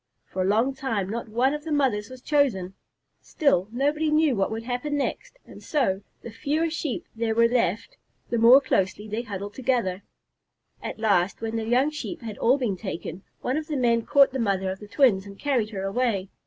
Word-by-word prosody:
For 185 - -4
a - - +1
long 225 +7 +2
time 225 -8 -2
not 230 0 -4
one 250 +5 +2
of 300 0 -4
the 320 - -6
mothers 255 -8 +1
was 255 0 -11
chosen. 235 -12 +1 0.5
Still, 280 - +1
nobody 295 +5 0
knew 305 -3 +3
what 195 -2 +1
would 225 +1 -4
happen 250 +5 -2
next, - - -3
and - - -13
so, 215 -11 0 0.2
the 235 - -7
fewer 310 +8 -1
Sheep 305 -5 -3
there 225 -1 -1
were 230 0 +5
left, 230 -3 -1 0.3
the 235 - +1
more 240 +4 +8
closely 205 -4 0
they 215 +2 -2
huddled 205 -3 -6
together. 235 -8 0 0.8
At - - -5
last, 200 -4 +1
when 225 0 -3
the 225 -1 -2
young 255 +6 +2
Sheep 305 +2 -6
had 220 -3 -7
all 255 +4 +4
been 230 -8 -1
taken, 185 -2 -6 0.2
one 255 +4 -1
of 310 0 -4
the 300 - -2
men 235 -2 +2
caught 280 0 +5
the 265 - -3
mother 195 -4 0
of 190 - -7
the 210 - -10
twins 205 -5 +3
and 200 0 -11
carried 250 -6 0
her 195 -3 -5
away. 195 -2 -1
235 Hz, 205 wpm, -25 LUFS, 205-275 Hz, 0.8 s, more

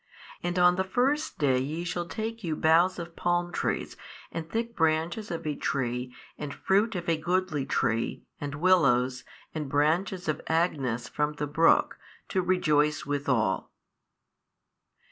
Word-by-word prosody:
And 175 +1 -2
on 180 0 +5
the 190 - +2
first 265 +10 0
day 130 -3 +2
ye 155 +6 -3
shall 175 0 -3
take 225 +3 -5
you 160 -3 -1
boughs 165 +4 +4
of 170 -1 -7
palm 175 0 0
trees - - -2 0.4
and 165 0 -5
thick 230 +2 -2
branches 165 +6 0
of 170 -1 -4
a 150 - 0
tree 125 -3 -2 0.3
and 145 -1 -4
fruit 205 +3 +1
of 175 -1 -4
a 165 -1 +2
goodly 165 -3 -1
tree 115 -2 0 0.2
and 145 0 -4
willows 130 -7 +3 0.3
and 150 -3 -4
branches 170 +6 +1
of 155 -1 -1
agnus 135 -8 0
from 150 +2 -1
the 150 0 -3
brook 160 +3 +3 0.3
to 185 - +1
rejoice 150 -5 +2
withal. 130 -9 0
160 Hz, 145 wpm, -28 LUFS, 145-180 Hz, 0.4 s, on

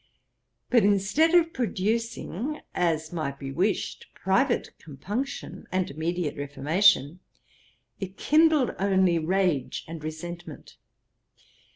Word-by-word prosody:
But 240 -4 +5
instead 205 - +3
of 330 -1 +4
producing, 230 - -2
as 160 -2 0
might 145 -5 -3
be 135 -1 -6
wished, 190 +8 -1
private 240 +7 +1
compunction 205 - -5
and 185 -3 -1
immediate 160 +1 -2
reformation, 145 +4 +2 0.8
it 195 0 -6
kindled 310 -4 +4
only 190 -3 +3
rage 170 -5 0
and 165 -1 -8
resentment. 160 0 -8
185 Hz, 95 wpm, -26 LUFS, 160-225 Hz, 0.8 s, But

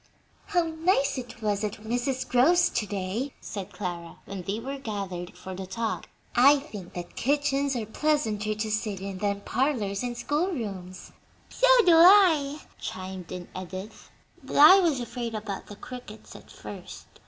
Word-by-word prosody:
"How 360 -4 +2
nice 320 -4 +1
it 245 -2 -10
was 205 -1 0
at 210 -1 -1
Mrs. 245 +4 -2
Grove's 325 +9 +4
to 210 - -1
day!" 205 +8 -3
said 200 -1 -7
Clara, 175 -3 -6
when 195 -2 -6
they 195 +5 -3
were 275 +4 -5
gathered 195 -7 -5
for 190 - -8
the 190 0 -6
talk. 220 +4 -3 0.3
"I 275 +4 +7
think 210 - -9
that 175 -1 -7
kitchens 280 0 +1
are 230 -3 -2
pleasanter 220 -5 0
to 215 0 -3
sit 210 -2 -2
in 195 -1 -6
than 200 0 -1
parlors 220 -7 -1
and 245 -1 -3
school 300 +8 0
rooms." 195 - -6 0.4
"So - - +2 0.2
do 350 - +7
I," 325 -5 +6 0.2
chimed 185 -1 -6
in 180 -1 -6
Edith; 185 +3 -8 0.3
"but - - -7
I 310 +7 +9
was 325 -8 +2
afraid 240 -1 -4
about 210 -2 -5
the 205 - -9
crickets 235 -1 -10
at - - -13
first. - - -10
225 Hz, 165 wpm, -27 LUFS, 195-280 Hz, 0.4 s, I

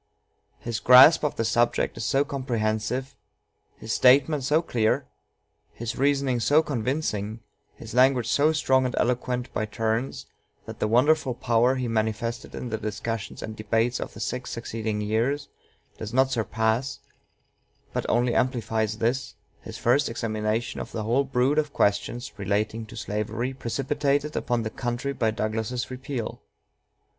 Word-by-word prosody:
His 115 -2 -4
grasp 130 +6 +8
of 150 - 0
the 115 - -1
subject 120 +2 +1
is - - -5
so 135 +7 +2
comprehensive, 125 -1 -2 0.6
his 110 0 -4
statement 135 +3 +4
so 150 +5 +2
clear, 110 -8 +1 0.7
his 115 +1 -5
reasoning 140 -2 +1
so 145 +7 +4
convincing, 115 -5 -2 0.3
his - - -10
language 125 -1 +4
so 145 +5 +3
strong 130 -4 +2
and 125 - -4
eloquent 125 0 -1
by 110 -2 -1
turns, 115 +3 -2 0.4
that - - -9
the - - +1
wonderful 130 +3 +3
power 120 +2 +2
he 130 -2 -2
manifested 115 +1 -2
in 125 - -5
the 110 - -2
discussions 110 0 -4
and 110 - -6
debates 115 +3 0
of - - -6
the - - -9
six 125 +5 -3
succeeding 110 -2 -3
years 115 +7 -1 0.5
does 110 +2 -6
not 130 0 +3
surpass, 115 +3 0 1.0
but - - -2
only 120 +1 +2
amplifies 110 -4 0
this, 120 +4 -1 0.3
his - - -8
first 130 +5 +2
examination 110 0 -2
of - - -8
the 110 - -3
whole 120 +6 +2
brood 135 +2 +1
of 150 -1 -2
questions 115 +5 0
relating 105 +3 -1
to - - -11
slavery 105 +5 -3
precipitated 140 +3 -1
upon 120 -2 0
the 110 - -4
country 120 +4 -3
by 115 -4 +1
Douglas's 110 +3 -2
repeal. 130 -2 -5
120 Hz, 145 wpm, -26 LUFS, 110-130 Hz, 1.0 s, grasp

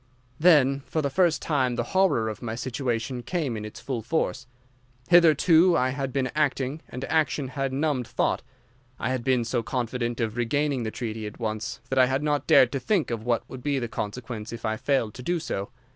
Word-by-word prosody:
"Then 145 -5 +5
for 155 - -1
the 140 - -1
first 175 0 +2
time 130 -5 +1
the 120 - 0
horror 185 -12 +3
of 110 - -5
my 115 -2 -4
situation 125 0 -2
came 150 -4 -2
in 105 - -5
its 105 +1 -8
full 120 0 -4
force. 130 -1 -1 0.6
Hitherto 170 +1 +6
I 130 - +2
had 135 0 -3
been 130 -2 -1
acting, 145 -1 0
and 125 +2 -5
action 155 -4 0
had 135 0 -2
numbed 135 -3 0
thought. - - 0 0.6
I 120 - -2
had 130 -2 -2
been 125 -2 +2
so 120 +1 0
confident 120 0 -2
of 115 -1 -2
regaining 140 +3 0
the 110 - -2
treaty 110 -2 -5
at 105 - -10
once 110 -1 -3
that 135 - +2
I 130 - +6
had 135 +2 -1
not 145 -2 0
dared 140 -6 +6
to 135 - -2
think 170 - 0
of 115 -2 -3
what 120 -2 0
would 130 - -9
be 145 +1 0
the 120 -3 -2
consequence 110 0 -5
if 115 0 -7
I 110 0 0
failed 125 -2 0
to 130 - -9
do 175 +6 -1
so. 100 -8 -4
130 Hz, 205 wpm, -26 LUFS, 115-145 Hz, 0.6 s, Hitherto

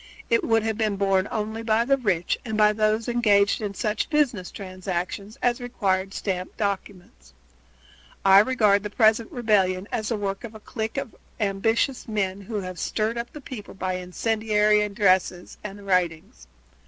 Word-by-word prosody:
It 230 - +3
would 225 -1 +2
have 220 0 -2
been 215 -2 +1
borne 195 -1 +1
only 220 0 -3
by 225 0 +2
the 275 +2 +4
rich 195 -10 0
and 220 -3 -3
by 210 0 +5
those 215 +1 +1
engaged 210 -4 +3
in 205 -2 -4
such 210 +3 -1
business 265 - +1
transactions 185 +1 -5
as 245 0 +1
required 195 -5 -1
stamped 185 -2 -3
documents. 185 - -5 0.9
I 195 0 +8
regard 210 -3 +3
the 210 - -5
present 220 +1 +3
rebellion 200 -5 +1
as 215 -2 -2
the 230 - 0
work 195 -1 -3
of 225 -2 -8
a - - -9
clique 220 +3 -5
of 275 -4 -4 0.2
ambitious 225 +6 0
men 200 -3 -2
who 205 +1 -4
have 185 -1 -7
stirred 225 +2 -1
up 235 - -5
the 300 - -10
people 230 -8 -9
by 185 -1 -2
incendiary 210 +3 +1
addresses 190 -3 +1
and 205 -1 -8
writings. 170 - -1
210 Hz, 165 wpm, -25 LUFS, 195-225 Hz, 0.9 s, I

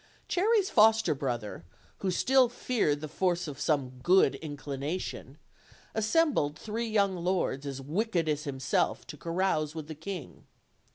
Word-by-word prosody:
Cherry's 405 +1 +2
foster 220 -4 +5
brother, 120 - -4 0.4
who 195 - -1
still 255 +7 +4
feared 215 -12 0
the 155 - -4
force 180 +1 0
of 140 -2 -7
some 130 -5 -1
good 185 +7 +5
inclination, 140 -2 -5 0.6
assembled 220 - +2
three 225 +5 -3
young 200 -3 +2
lords 170 -6 -1
as 135 -1 -5
wicked 170 - -1
as 150 0 -1
himself, 135 -1 0
to - - -8
carouse 165 -1 -1
with 155 -2 -6
the 160 - -6
king. 165 +2 -8
165 Hz, 135 wpm, -29 LUFS, 145-210 Hz, 0.6 s, foster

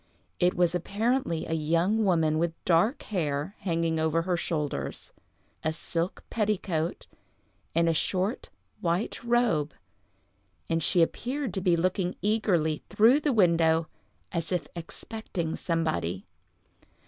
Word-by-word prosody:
It 180 0 +3
was 175 -1 +2
apparently 200 0 0
a - - -3
young 165 +7 +2
woman 160 -5 +2
with 165 0 0
dark 210 - +3
hair 155 -1 -2
hanging 165 -3 0
over 160 +1 +1
her 180 0 0
shoulders, 155 -4 -3 0.5
a 160 - +1
silk 165 +2 -3
petticoat, 190 -7 -1 0.7
and 170 0 +3
a 165 - +3
short, 190 - -1 0.3
white 175 +7 -1
robe, 235 - +1 0.9
and 165 0 0
she 170 +2 +4
appeared 255 - -2
to 190 - -2
be 180 -2 +3
looking 185 +1 0
eagerly 185 -8 +1
through 235 +7 +5
the 300 -1 +1
window, 165 -6 +3 0.4
as 170 -2 -3
if 180 -3 -1
expecting 170 0 -4
somebody. 155 - -1
170 Hz, 125 wpm, -28 LUFS, 160-205 Hz, 0.9 s, through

